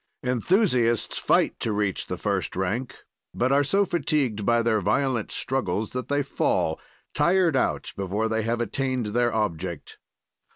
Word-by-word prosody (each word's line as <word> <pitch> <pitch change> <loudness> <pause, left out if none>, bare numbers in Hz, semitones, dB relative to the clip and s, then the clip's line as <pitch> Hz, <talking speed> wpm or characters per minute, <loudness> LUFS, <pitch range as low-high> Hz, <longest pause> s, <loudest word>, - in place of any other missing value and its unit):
"Enthusiasts 125 - +1
fight - - +2
to 115 - -1
reach 105 -2 -1
the - - -4
first - - -2
rank, 100 +8 -3 0.3
but 125 +2 +1
are 140 +1 +4
so 200 +8 +2
fatigued 145 - 0
by 120 0 +3
their 110 -2 +2
violent 120 +3 0
struggles 110 -5 -1
that 125 0 -4
they 145 0 +1
fall, 80 -11 0 0.3
tired 175 -4 +3
out, 130 - 0
before 100 +3 -1
they 110 0 0
have 115 +2 -1
attained 130 +1 -1
their 120 0 +2
object. 90 -6 -3
120 Hz, 150 wpm, -25 LUFS, 105-135 Hz, 0.3 s, are